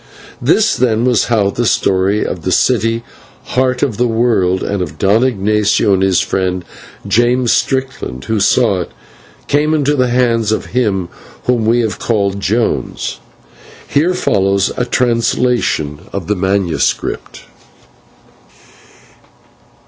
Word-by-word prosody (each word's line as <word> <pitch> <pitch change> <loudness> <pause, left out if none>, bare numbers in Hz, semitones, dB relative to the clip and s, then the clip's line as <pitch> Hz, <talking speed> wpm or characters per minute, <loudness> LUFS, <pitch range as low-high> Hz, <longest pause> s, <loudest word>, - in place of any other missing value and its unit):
This, 220 0 +3
then, 120 -2 +1
was 125 -3 +2
how 105 -4 +1
the 120 +3 -1
story 95 +2 +1
of 90 - -4
the 95 - -2
city, 115 +2 +1 0.4
Heart 130 0 0
of 130 -7 -1
the 125 +1 +2
World, 110 -6 +1
and 100 -2 -2
of 90 - -5
Don 105 +4 +2
Ignatio 105 -3 +1
and 95 - +1
his 95 -2 +3
friend, 90 -1 -2 0.4
James 120 +1 +2
Strickland, 130 - -2
who 110 -1 -1
saw 100 -1 +2
it, - - -6 0.6
came 150 +2 +2
into 145 -1 +1
the 130 -2 +2
hands 115 -3 +1
of 110 - -1
him 100 -8 0 0.3
whom 120 -3 0
we 120 +2 +3
have 110 -2 -3
called 100 -3 -1
Jones. 110 +4 -2 0.7
Here 170 +6 +1
follows 100 - +1
a 125 - -1
translation 115 - 0
of 100 -4 -4
the 105 - -1
manuscript. 95 -2 -1
110 Hz, 130 wpm, -15 LUFS, 95-125 Hz, 0.7 s, This